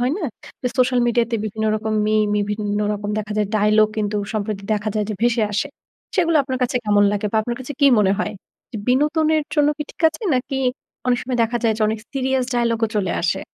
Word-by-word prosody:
হয় 250 Hz, +3 st, +1 dB
না? 390 Hz, -, -6 dB, 0.6 s
Social 250 Hz, 0 st, +3 dB
media 240 Hz, 0 st, +3 dB
তে 230 Hz, -, +1 dB
বিভিন্ন 220 Hz, +1 st, -2 dB
রকম 215 Hz, 0 st, -3 dB
মিম 215 Hz, 0 st, +2 dB, 0.2 s
বিভিন্ন 205 Hz, 0 st, -2 dB, 0.2 s
রকম 205 Hz, 0 st, -4 dB
দেখা 215 Hz, 0 st, -4 dB
যায় 210 Hz, -1 st, +1 dB
ডায়লগ 215 Hz, +1 st, +4 dB
কিন্তু 210 Hz, 0 st, -1 dB, 0.2 s
সম্প্রতি 205 Hz, -1 st, -2 dB
দেখা 210 Hz, +1 st, -2 dB
যায় 210 Hz, -1 st, +1 dB
যে, -, -, -2 dB
ভেসে 235 Hz, -1 st, +3 dB
আসে। 210 Hz, +8 st, -1 dB, 0.5 s
সেগুলো 335 Hz, -3 st, +3 dB
আপনার 260 Hz, -2 st, -3 dB
কাছে 250 Hz, -, 0 dB
কেমন 205 Hz, -1 st, +4 dB
লাগে 205 Hz, +1 st, -1 dB
বা -, -, +1 dB
আপনার 240 Hz, +2 st, -3 dB
কাছে 260 Hz, +3 st, -6 dB
কী 280 Hz, -, +6 dB
মনে 195 Hz, -1 st, +3 dB
হয়? 210 Hz, -, -2 dB, 0.6 s
বিনোদনের 305 Hz, +4 st, +2 dB
জন্য 295 Hz, -2 st, +4 dB
কি 300 Hz, -, -1 dB
ঠিক -, -, -13 dB
আছে? 320 Hz, +8 st, -11 dB
নাকি 265 Hz, +1 st, -1 dB, 0.5 s
অনেক 245 Hz, -1 st, +3 dB
সময় 250 Hz, 0 st, -3 dB
দেখা 235 Hz, +2 st, -2 dB
যায় 220 Hz, -1 st, +3 dB
যে, 220 Hz, -, 0 dB
অনেক 220 Hz, 0 st, -1 dB
সিরিয়াস 265 Hz, -1 st, 0 dB
ডায়ালগ 235 Hz, -1 st, +1 dB
ও -, -, -10 dB
চলে 185 Hz, -4 st, -1 dB
আসে? 175 Hz, -, 0 dB
230 Hz, 215 wpm, -21 LUFS, 210-260 Hz, 0.6 s, কী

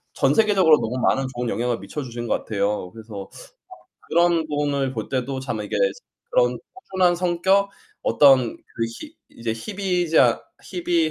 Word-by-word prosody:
전 -, -, +2 dB
세계적으로 195 Hz, -8 st, +5 dB
너무 120 Hz, +2 st, -3 dB
많은 135 Hz, -, +2 dB
좋은 120 Hz, -1 st, -2 dB
영향을 120 Hz, 0 st, -1 dB
미쳐주신 120 Hz, +3 st, -6 dB
것 -, -, +2 dB
같아요. 100 Hz, -3 st, -1 dB
그래서 110 Hz, -2 st, -9 dB, 0.7 s
아 -, -, -24 dB
그런 170 Hz, -1 st, +3 dB
분을 145 Hz, -3 st, -1 dB
볼 110 Hz, -3 st, -5 dB
때도 130 Hz, 0 st, -2 dB
참 120 Hz, -5 st, -4 dB
이게 -, -, -3 dB, 0.6 s
그런 -, -, +3 dB, 0.2 s
꾸준한 190 Hz, -, +1 dB
성격, 185 Hz, +3 st, +2 dB, 0.3 s
어떤 135 Hz, -5 st, +5 dB
그 -, -, -30 dB, 0.4 s
희 310 Hz, +1 st, -10 dB, 0.2 s
이제 115 Hz, -1 st, -4 dB
희비자 175 Hz, -, +1 dB, 0.2 s
희비 170 Hz, -3 st, 0 dB
145 Hz, 295 characters per minute, -23 LUFS, 120-175 Hz, 0.7 s, 세계적으로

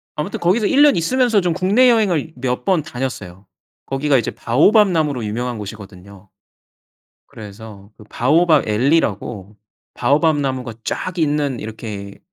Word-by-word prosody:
아무튼 155 Hz, +7 st, -4 dB
거기서 195 Hz, +5 st, +1 dB
1 280 Hz, -, +2 dB
년 290 Hz, -, +5 dB
있으면서 235 Hz, +4 st, +1 dB
좀 175 Hz, -2 st, 0 dB
국내 205 Hz, +9 st, +3 dB
여행을 180 Hz, -9 st, +1 dB
몇 125 Hz, 0 st, -3 dB
번 185 Hz, -6 st, +1 dB
다녔어요. 105 Hz, -9 st, -6 dB, 0.4 s
거기가 135 Hz, 0 st, +1 dB
이제 115 Hz, -, -2 dB
바오밥 195 Hz, -, +3 dB
나무로 150 Hz, -8 st, -1 dB
유명한 120 Hz, +3 st, -3 dB
곳이거든요. 100 Hz, -1 st, -11 dB, 1.0 s
그래서 105 Hz, -3 st, -12 dB
그 105 Hz, -, -14 dB
바오밥 155 Hz, +5 st, +2 dB
앨리라고 105 Hz, -, -1 dB, 0.4 s
바오밥 145 Hz, +5 st, +2 dB
나무가 130 Hz, -4 st, -3 dB
쫙 185 Hz, -1 st, -4 dB
있는 145 Hz, -5 st, 0 dB
이렇게 105 Hz, -2 st, -8 dB
135 Hz, 315 characters per minute, -19 LUFS, 110-170 Hz, 1.0 s, 년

